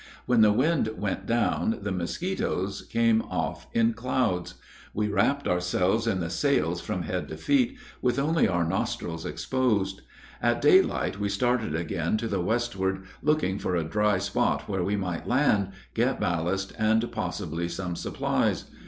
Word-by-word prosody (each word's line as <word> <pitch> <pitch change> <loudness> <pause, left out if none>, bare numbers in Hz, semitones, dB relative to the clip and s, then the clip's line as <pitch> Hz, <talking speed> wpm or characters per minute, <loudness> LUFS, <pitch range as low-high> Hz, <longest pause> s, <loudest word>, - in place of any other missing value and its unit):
When 120 -2 +4
the 105 -1 +7
wind 135 +3 +2
went 95 -1 -3
down, 115 -1 +1
the 105 - -2
mosquitos 95 - -2
came 115 -1 +2
off 80 -3 -4
in 115 0 +3
clouds. 115 -6 -1 0.4
We 105 0 0
wrapped 135 +8 +1
ourselves 90 +5 +1
in 95 -5 +1
the 85 0 -3
sails 140 -1 +1
from - - -3
head - - -3
to - - -7
feet, 275 -2 +2 0.2
with 125 -1 +1
only 155 +4 +3
our 85 -3 +1
nostrils 80 0 -2
exposed. 100 -7 0 0.4
At - - +2
daylight 100 - +3
we 100 0 0
started 115 -4 0
again 85 +3 -1
to 115 - -3
the 100 -4 -1
westward, 95 -3 -1 0.2
looking 145 -10 +1
for 90 - -1
a 85 - +1
dry 105 +5 +1
spot 95 0 0
where 95 -3 -1
we 100 +3 0
might 90 -4 -3
land, 120 -7 +3 0.2
get - - +1
ballast, 90 +3 -1
and 110 +2 +2
possibly 85 -6 -3
some 90 0 -4
supplies. - - -1
100 Hz, 155 wpm, -27 LUFS, 90-115 Hz, 0.4 s, the